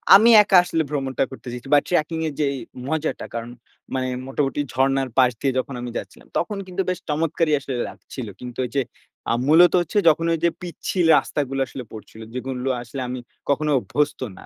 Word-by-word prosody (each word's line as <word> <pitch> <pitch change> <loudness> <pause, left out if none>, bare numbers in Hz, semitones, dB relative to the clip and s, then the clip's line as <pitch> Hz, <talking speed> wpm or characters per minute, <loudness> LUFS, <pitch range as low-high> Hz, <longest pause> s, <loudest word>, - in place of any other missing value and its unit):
আমি 220 +4 +7
একা 195 -2 +5
আসলে 165 -2 0
ভ্রমণটা 135 -3 -1
করতে 130 - -11
চাইছি। 125 +2 -8
বাট 145 - +5
ট্র্যাকিং 165 -2 0
এর 155 - -4
যেই 140 -1 +1 0.3
মজাটা 160 0 -2
কারণ, 115 +1 -4 0.4
মানে 130 -1 0 0.2
মোটামুটি 135 +1 -1
ঝরনার 135 0 +1
পাশ 125 -1 +6
দিয়ে 135 - +2
যখন 135 +1 -4
আমি 120 -1 -5
যাচ্ছিলাম। - - -9
তখন 205 +4 -3
কিন্তু 185 +1 -2
বেশ 185 - -1
চমৎকারই 155 +1 +1
আসলে 135 -2 -4
লাগছিল। 125 -4 -8
কিন্তু 125 -1 -8
ওইযে 135 +3 -1 0.5
আ - - +3
মূলত 170 +3 +7
হচ্ছে 175 +5 -3
যখন 165 +1 +2
ওই 165 - -1
যে 170 - +5
পিচ্ছিল 175 0 -2
রাস্তাগুলা 135 -2 -1
আসলে 125 +2 -7
পড়ছিলো, 110 +1 -10
যেগুলো 130 +1 -3
আসলে 125 +3 -6
আমি 125 0 -4 0.3
কখনো 150 +2 +1
অভ্যস্ত 145 +3 -1 0.2
না। - - -12
140 Hz, 185 wpm, -23 LUFS, 130-160 Hz, 0.5 s, আমি